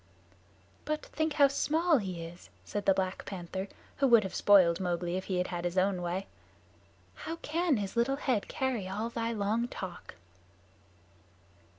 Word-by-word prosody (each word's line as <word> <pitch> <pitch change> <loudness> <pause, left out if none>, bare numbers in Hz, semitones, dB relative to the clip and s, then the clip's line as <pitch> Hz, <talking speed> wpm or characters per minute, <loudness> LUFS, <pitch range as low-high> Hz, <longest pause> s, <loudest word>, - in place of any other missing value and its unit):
"But 305 0 -2
think 315 -1 -1
how 285 -2 +6
small 310 +3 +2
he 185 -5 -4
is," 170 +2 -11 0.2
said 205 -1 -4
the 195 - +7
Black 190 -1 -2
Panther, 190 +1 -5 0.3
who 275 - +3
would 235 -3 +6
have 190 - -5
spoiled 185 -5 +5
Mowgli 175 -1 -1
if 185 - -3
he 185 - -1
had 180 - 0
had 175 -1 -3
his 175 +1 -2
own 185 -1 +2
way. 175 +3 -2 0.9
"How 330 - -6
can 330 -2 +1
his 200 0 -4
little 235 +4 +2
head 255 -7 0
carry 255 -8 -2
all 215 +5 -3
thy 230 0 -2
long 220 +2 0
talk?" 180 - -8
200 Hz, 165 wpm, -31 LUFS, 185-260 Hz, 0.9 s, the